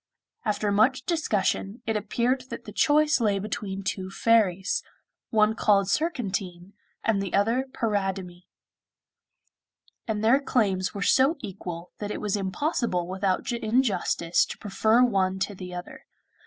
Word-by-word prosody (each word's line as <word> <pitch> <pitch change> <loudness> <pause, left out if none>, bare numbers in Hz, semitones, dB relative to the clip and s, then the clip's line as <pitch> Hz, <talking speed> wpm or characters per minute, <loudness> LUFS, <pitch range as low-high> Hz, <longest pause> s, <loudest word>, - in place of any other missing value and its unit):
After 210 -1 0
much 250 +6 +3
discussion, 220 - -1
it 225 - -1
appeared 240 +5 0
that - - -7
the 210 - -8
choice 300 +5 +3
lay 205 -3 +2
between 195 -1 -4
two 190 -1 -3
fairies, 195 -3 +2 0.5
one 215 -1 +3
called 200 -3 +2
Surcantine 200 - -2 0.3
and 215 -3 +1
the 195 -3 -2
other 230 +6 +2
Paridamie; 195 -6 -2 1.6
and 215 -1 -2
their 235 +5 +5
claims 195 -9 0
were 200 - -2
so 270 +5 +4
equal 180 -5 -7
that 205 - -4
it - - -4
was 210 -1 -1
impossible 195 - -1
without 190 +4 -1
injustice 220 -7 +1
to - - -7
prefer 220 +4 +2
one 190 -5 +1
to 195 +2 -2
the 185 -1 -8
other. 180 0 -9
205 Hz, 135 wpm, -26 LUFS, 190-235 Hz, 1.6 s, their